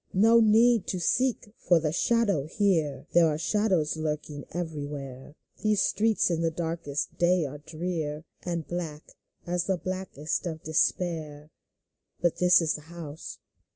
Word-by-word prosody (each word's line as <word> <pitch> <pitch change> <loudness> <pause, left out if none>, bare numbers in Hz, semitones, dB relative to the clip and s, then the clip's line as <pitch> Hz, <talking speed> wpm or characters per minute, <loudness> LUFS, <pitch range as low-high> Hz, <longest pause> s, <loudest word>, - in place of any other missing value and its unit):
No 225 +4 +6
need 225 0 +4
to 185 - -2
seek 230 +3 0
for 175 -2 +4
the 155 -1 -1
shadow 200 -5 +1
here; 160 - 0
There 170 -1 +6
are 150 -1 0
shadows 185 -4 +1
lurking 150 -2 -4
everywhere; 145 -5 -6 0.3
These 210 -2 +2
streets 220 -3 +2
in 165 -1 0
the 165 - +2
brightest 160 -3 -4
day 175 -1 +3
are 145 +1 -7
drear. 160 -1 -4 0.2
And 170 -3 -3
black 165 -3 -5 0.3
as 175 0 -1
the 190 -2 0
blackness 180 -4 -3
of 160 -3 -5
despair. 155 -2 -1 0.7
But 175 -2 +1
this 180 -1 +5
is 160 - +1
the 150 - -6
house. 160 -3 -8
165 Hz, 145 wpm, -27 LUFS, 150-185 Hz, 0.7 s, No